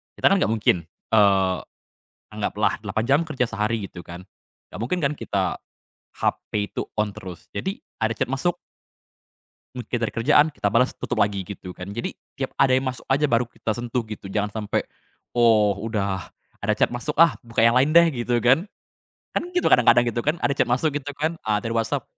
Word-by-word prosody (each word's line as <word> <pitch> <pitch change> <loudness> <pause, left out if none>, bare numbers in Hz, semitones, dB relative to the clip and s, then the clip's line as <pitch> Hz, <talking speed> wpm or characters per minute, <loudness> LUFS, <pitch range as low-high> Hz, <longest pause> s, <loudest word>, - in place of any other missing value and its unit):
kita - - +3
kan 195 - +4
gak - - +2
mungkin, 90 -7 +1 0.2
eee, 95 -4 +4 0.8
anggaplah - - -1
8 110 - -2
jam 140 +4 +4
kerja 150 -7 -1
sehari 110 -1 -2
gitu 90 - -11
kan, 85 +2 -10 0.5
nggak 90 - -7
mungkin 135 +10 -1
kan 140 - +2
kita 95 -8 -2 0.6
HP 105 -1 -1
itu - - -1 0.2
on 105 -1 +2
terus, 90 -5 -10
jadi 190 +1 -3 0.2
ada 110 - +2
chat - - -2
masuk 135 +7 -1 1.2
mungkin 125 0 -3
dari 115 - -1
kerjaan, 145 +6 +4
kita 100 - 0
bales, 125 +4 +2
tutup - - -3
lagi, 100 -1 +1
gitu 90 -1 -9
kan. 90 +3 -7
Jadi 120 +3 -4 0.2
tiap 135 - -3
ada 135 -1 +4
yang 130 +1 +2
masuk 125 -2 -5
aja 145 +3 +3
baru 120 -1 +2
kita 110 -1 -4
sentuh 120 +1 -2
gitu 105 -2 -8
jangan 105 0 0 0.2
sampe 105 - -1 0.5
oh 110 -4 +4
udah, 100 -4 -2 0.3
"Ada 105 - +2
chat - - +4
masuk 145 +5 -4
ah 165 -2 +6
buka 115 0 -4
yang 115 +1 +5
lain 135 +4 +4
deh," 170 +1 +7 0.2
gitu 120 0 +1
kan. 135 +9 +4 0.7
Kan 350 - -2
gitu 355 - +2
kadang-kadang 120 0 +6
gitu 120 0 -1
kan 150 +6 +1
ada - - +3
chat - - +1
masuk 130 +6 +1
gitu 145 0 -8
kan, 160 +3 -2
a 105 - +3
dari 115 - -3
WhatsApp 115 -1 -1
115 Hz, 190 wpm, -23 LUFS, 105-135 Hz, 1.2 s, deh